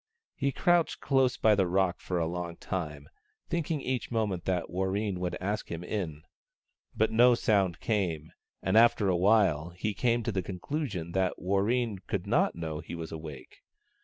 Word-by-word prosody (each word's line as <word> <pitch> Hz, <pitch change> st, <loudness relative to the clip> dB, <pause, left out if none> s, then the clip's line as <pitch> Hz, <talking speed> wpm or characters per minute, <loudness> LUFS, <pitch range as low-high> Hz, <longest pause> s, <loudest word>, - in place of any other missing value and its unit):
He 140 Hz, -, -1 dB
crouched 175 Hz, +2 st, +2 dB
close 135 Hz, -2 st, +2 dB
by 110 Hz, -, +4 dB
the 95 Hz, -3 st, +2 dB
rock 90 Hz, 0 st, +1 dB
for 90 Hz, -, -3 dB
a 85 Hz, -, +1 dB
long 85 Hz, 0 st, -4 dB
time, 75 Hz, -6 st, -4 dB, 0.4 s
thinking 165 Hz, -3 st, -1 dB
each 130 Hz, -3 st, -2 dB
moment 105 Hz, -7 st, -1 dB
that 90 Hz, -2 st, 0 dB
Warreen 95 Hz, +2 st, -1 dB
would 90 Hz, -1 st, -2 dB
ask 100 Hz, +3 st, -3 dB
him 85 Hz, +1 st, -4 dB
in. 85 Hz, -6 st, -4 dB, 0.7 s
But 110 Hz, -, +2 dB
no 120 Hz, +2 st, +6 dB
sound 100 Hz, -7 st, +1 dB
came, 85 Hz, -8 st, -1 dB, 0.3 s
and -, -, +1 dB
after 115 Hz, -3 st, +5 dB
a 90 Hz, -, +3 dB
while 90 Hz, -4 st, +3 dB
he 90 Hz, +5 st, -3 dB
came 120 Hz, +3 st, +1 dB
to 115 Hz, -, -1 dB
the 95 Hz, -2 st, -1 dB
conclusion 95 Hz, -, -4 dB
that 95 Hz, 0 st, 0 dB
Warreen 100 Hz, +3 st, 0 dB
could -, -, -2 dB
not -, -, +2 dB
know 80 Hz, -2 st, -4 dB
he 85 Hz, +1 st, -7 dB
was 80 Hz, -1 st, -6 dB
awake. 75 Hz, -4 st, -9 dB
95 Hz, 170 wpm, -29 LUFS, 85-110 Hz, 0.7 s, no